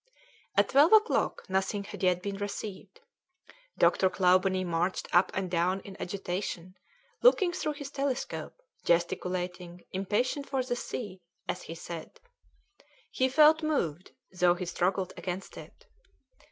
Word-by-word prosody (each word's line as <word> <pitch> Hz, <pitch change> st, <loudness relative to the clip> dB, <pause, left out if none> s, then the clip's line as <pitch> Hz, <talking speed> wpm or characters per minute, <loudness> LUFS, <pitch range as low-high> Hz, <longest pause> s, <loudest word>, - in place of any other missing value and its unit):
At -, -, +4 dB
twelve 295 Hz, +8 st, +5 dB
o'clock 435 Hz, +1 st, +3 dB
nothing 190 Hz, +2 st, -1 dB
had -, -, -9 dB
yet 180 Hz, -1 st, +2 dB
been 200 Hz, -1 st, -3 dB
received. 205 Hz, -, -6 dB, 0.8 s
Dr. 190 Hz, -, +4 dB
Clawbonny 185 Hz, 0 st, +3 dB
marched 175 Hz, +2 st, -1 dB
up 175 Hz, +2 st, +5 dB
and 190 Hz, -1 st, -1 dB
down 180 Hz, +2 st, +1 dB
in 195 Hz, 0 st, -10 dB
agitation, 185 Hz, -1 st, -4 dB, 0.5 s
looking 405 Hz, -7 st, +5 dB
through 305 Hz, -, -2 dB
his 285 Hz, -2 st, -8 dB
telescope, 275 Hz, -, -3 dB, 0.2 s
gesticulating, 175 Hz, 0 st, -1 dB
impatient 220 Hz, +9 st, -1 dB
for 265 Hz, -2 st, 0 dB
the 245 Hz, -1 st, -2 dB
sea, 205 Hz, -6 st, -6 dB, 0.3 s
as -, -, -3 dB
he 165 Hz, -, -8 dB
said. 170 Hz, -, -8 dB, 0.9 s
He 260 Hz, 0 st, +1 dB
felt 310 Hz, +3 st, +6 dB
moved, 185 Hz, -, -2 dB, 0.2 s
though 180 Hz, -1 st, +3 dB
he 180 Hz, +1 st, -4 dB
struggled 185 Hz, +2 st, -1 dB
against 180 Hz, +2 st, -5 dB
it. -, -, -12 dB
190 Hz, 130 wpm, -29 LUFS, 180-255 Hz, 0.9 s, felt